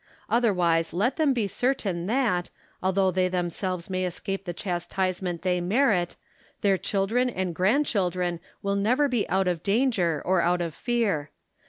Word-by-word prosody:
Otherwise 180 Hz, -9 st, +2 dB
let 215 Hz, +9 st, +1 dB
them 310 Hz, -3 st, +3 dB
be 235 Hz, -6 st, 0 dB
certain 195 Hz, -7 st, -1 dB
that, 215 Hz, -7 st, +1 dB, 0.3 s
although 190 Hz, 0 st, +2 dB
they 185 Hz, 0 st, +2 dB
themselves 180 Hz, 0 st, -2 dB
may 185 Hz, -1 st, -2 dB
escape 195 Hz, +2 st, -3 dB
the 175 Hz, -, -3 dB
chastisement 180 Hz, 0 st, -2 dB
they 180 Hz, -1 st, +1 dB
merit, 185 Hz, -2 st, +2 dB, 0.5 s
their 200 Hz, -1 st, +3 dB
children 200 Hz, +7 st, 0 dB
and 185 Hz, -6 st, -2 dB
grand 215 Hz, -, +2 dB
children 180 Hz, -6 st, -1 dB, 0.2 s
will 200 Hz, 0 st, 0 dB
never 245 Hz, +9 st, +2 dB
be 245 Hz, -6 st, -1 dB
out 190 Hz, 0 st, +2 dB
of 175 Hz, -3 st, 0 dB
danger 200 Hz, -, +1 dB
or 185 Hz, -1 st, +3 dB
out 175 Hz, +1 st, +2 dB
of 170 Hz, -2 st, -3 dB
fear. 210 Hz, -12 st, -1 dB
190 Hz, 155 wpm, -26 LUFS, 175-220 Hz, 0.5 s, them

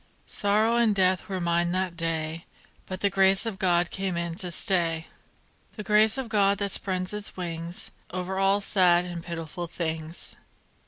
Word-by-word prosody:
Sorrow 215 Hz, +3 st, +1 dB
and 230 Hz, -3 st, +3 dB
death 185 Hz, -1 st, +2 dB
were 190 Hz, -1 st, -2 dB
mine 170 Hz, 0 st, +1 dB
that 185 Hz, -2 st, -1 dB
day, 165 Hz, -1 st, -2 dB, 0.4 s
But 185 Hz, 0 st, -6 dB
the 200 Hz, -, +3 dB
Grace 195 Hz, +2 st, +4 dB
of 215 Hz, -4 st, -4 dB
God 175 Hz, -3 st, +2 dB
came 190 Hz, -2 st, -2 dB
in 170 Hz, -1 st, -2 dB
to 180 Hz, -, -3 dB
stay; 170 Hz, -2 st, +3 dB, 0.7 s
The 210 Hz, -, -6 dB
Grace 215 Hz, +2 st, +4 dB
of 265 Hz, -2 st, -3 dB
God 200 Hz, -2 st, +3 dB
that 200 Hz, -1 st, -1 dB
spread 185 Hz, 0 st, -1 dB
its 210 Hz, -2 st, -6 dB
wings 170 Hz, -1 st, -4 dB, 0.2 s
Over 185 Hz, +1 st, -3 dB
all 195 Hz, +1 st, +3 dB
sad 180 Hz, -3 st, +3 dB
and 175 Hz, -2 st, -6 dB
pitiful 170 Hz, 0 st, -6 dB
things. 160 Hz, -1 st, -4 dB
185 Hz, 165 wpm, -26 LUFS, 170-200 Hz, 0.7 s, Grace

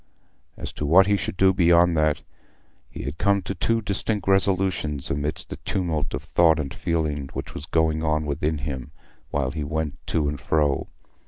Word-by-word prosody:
As -, -, -6 dB
to 75 Hz, -, -4 dB
what 90 Hz, +5 st, +7 dB
he 100 Hz, +1 st, +3 dB
should 95 Hz, -1 st, -3 dB
do 95 Hz, 0 st, +5 dB
beyond 85 Hz, -1 st, +4 dB
that, 75 Hz, -1 st, +1 dB, 0.7 s
he -, -, -7 dB
had 70 Hz, +5 st, -5 dB
come 100 Hz, -1 st, +2 dB
to 95 Hz, -, -3 dB
two 115 Hz, +2 st, 0 dB
distinct 100 Hz, 0 st, -2 dB
resolutions 95 Hz, -7 st, +1 dB
amidst 75 Hz, +2 st, -2 dB
the -, -, -5 dB
tumult 85 Hz, -6 st, -2 dB
of -, -, -6 dB
thought 80 Hz, -2 st, +3 dB
and 70 Hz, -3 st, -3 dB
feeling 75 Hz, -4 st, -2 dB
which -, -, -6 dB
was 75 Hz, -, -7 dB
going 80 Hz, -1 st, +1 dB
on 75 Hz, 0 st, +1 dB
within 75 Hz, +2 st, -1 dB
him 65 Hz, -2 st, -5 dB, 0.4 s
while 70 Hz, -2 st, -1 dB
he 75 Hz, -1 st, -4 dB
went 80 Hz, 0 st, -3 dB
to 75 Hz, -3 st, +1 dB
and 70 Hz, -1 st, -3 dB
fro. 75 Hz, -3 st, +1 dB
80 Hz, 180 wpm, -24 LUFS, 75-95 Hz, 0.7 s, what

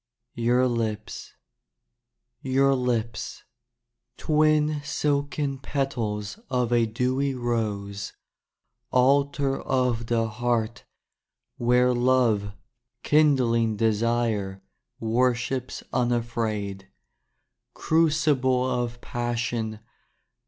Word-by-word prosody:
Your 120 Hz, +2 st, +2 dB
Lips 110 Hz, -3 st, -3 dB, 1.1 s
Your 135 Hz, +1 st, +3 dB
Lips, 120 Hz, -3 st, -2 dB, 0.7 s
Twin 155 Hz, -1 st, +2 dB
silken 145 Hz, -1 st, -1 dB
petals 120 Hz, -, -3 dB
Of 125 Hz, -2 st, 0 dB
a 120 Hz, -1 st, +3 dB
dewy 130 Hz, +4 st, 0 dB
rose. 105 Hz, -5 st, -2 dB, 0.8 s
Altar 140 Hz, +1 st, +2 dB
Of 125 Hz, -3 st, 0 dB
the 115 Hz, -1 st, +1 dB
heart 115 Hz, 0 st, -2 dB, 0.7 s
Where 125 Hz, +1 st, +3 dB
love 120 Hz, -5 st, +2 dB, 0.5 s
Kindling 125 Hz, -7 st, +3 dB
desire 110 Hz, -3 st, 0 dB, 0.4 s
Worships 125 Hz, +2 st, 0 dB
unafraid. 115 Hz, -5 st, -1 dB, 0.9 s
Crucible 145 Hz, -5 st, +2 dB
Of 120 Hz, -1 st, -2 dB
Passion. 120 Hz, -2 st, -3 dB
120 Hz, 70 wpm, -25 LUFS, 115-135 Hz, 1.1 s, Your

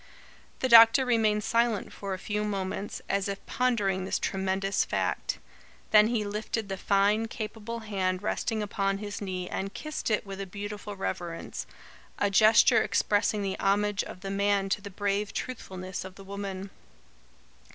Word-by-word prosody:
The 260 Hz, -, +2 dB
doctor 230 Hz, +2 st, +8 dB
remained 220 Hz, -3 st, +2 dB
silent 230 Hz, -2 st, +1 dB
for 195 Hz, -1 st, -4 dB
a -, -, -7 dB
few 210 Hz, +2 st, -2 dB
moments, 200 Hz, 0 st, -3 dB
as 195 Hz, 0 st, 0 dB
if 200 Hz, 0 st, -5 dB
pondering 205 Hz, -7 st, +1 dB
this 190 Hz, -, -1 dB
tremendous 195 Hz, 0 st, 0 dB
fact. -, -, -1 dB, 0.5 s
Then 210 Hz, 0 st, +7 dB
he 225 Hz, -2 st, 0 dB
lifted 210 Hz, +1 st, -3 dB
the 195 Hz, -, -2 dB
fine, 205 Hz, +4 st, +2 dB
capable 225 Hz, 0 st, -5 dB
hand 190 Hz, -3 st, -1 dB
resting 215 Hz, 0 st, -1 dB
upon 195 Hz, -1 st, -1 dB
his 205 Hz, 0 st, -6 dB
knee 185 Hz, -2 st, -3 dB
and 195 Hz, +2 st, -4 dB
kissed 305 Hz, -4 st, -4 dB
it 215 Hz, -1 st, +1 dB
with 195 Hz, 0 st, -6 dB
a 195 Hz, -, -5 dB
beautiful 205 Hz, +1 st, -6 dB
reverence, 175 Hz, -3 st, -4 dB, 0.5 s
a 205 Hz, -, +1 dB
gesture 220 Hz, +4 st, +6 dB
expressing 205 Hz, 0 st, +1 dB
the 195 Hz, -1 st, -3 dB
homage 205 Hz, +1 st, +2 dB
of 185 Hz, -, -10 dB
the 195 Hz, -1 st, -4 dB
man 200 Hz, 0 st, +1 dB
to 205 Hz, -, 0 dB
the 200 Hz, -, -7 dB
brave 200 Hz, +1 st, -2 dB
truthfulness 185 Hz, -7 st, -5 dB
of 190 Hz, 0 st, -10 dB
the 195 Hz, -, -11 dB
woman. 195 Hz, -1 st, -6 dB
205 Hz, 160 wpm, -28 LUFS, 195-215 Hz, 0.5 s, doctor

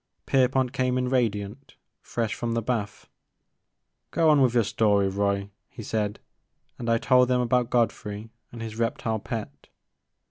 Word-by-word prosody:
Pierpont 130 Hz, -1 st, +2 dB
came 125 Hz, 0 st, 0 dB
in 125 Hz, 0 st, 0 dB
radiant, 115 Hz, 0 st, -2 dB, 0.3 s
fresh 115 Hz, -2 st, -2 dB
from 120 Hz, -1 st, -3 dB
the 115 Hz, -, +1 dB
bath. 110 Hz, -3 st, -3 dB, 1.0 s
Go 165 Hz, -1 st, +3 dB
on 145 Hz, -2 st, +5 dB
with 125 Hz, -2 st, +3 dB
your 120 Hz, -, +5 dB
story, 100 Hz, -1 st, +2 dB
Roy,'* 100 Hz, 0 st, -1 dB, 0.2 s
he 115 Hz, -, -9 dB
said; 105 Hz, -1 st, -2 dB, 0.6 s
and 120 Hz, -2 st, -3 dB
I 115 Hz, -, +4 dB
told 125 Hz, +1 st, +4 dB
them 125 Hz, 0 st, +2 dB
about 125 Hz, 0 st, +1 dB
Godfrey 110 Hz, -2 st, -1 dB, 0.2 s
and 115 Hz, -1 st, -7 dB
his 110 Hz, 0 st, -7 dB
reptile 115 Hz, -1 st, -1 dB
pet. 110 Hz, +1 st, -6 dB
115 Hz, 150 wpm, -26 LUFS, 105-125 Hz, 1.0 s, on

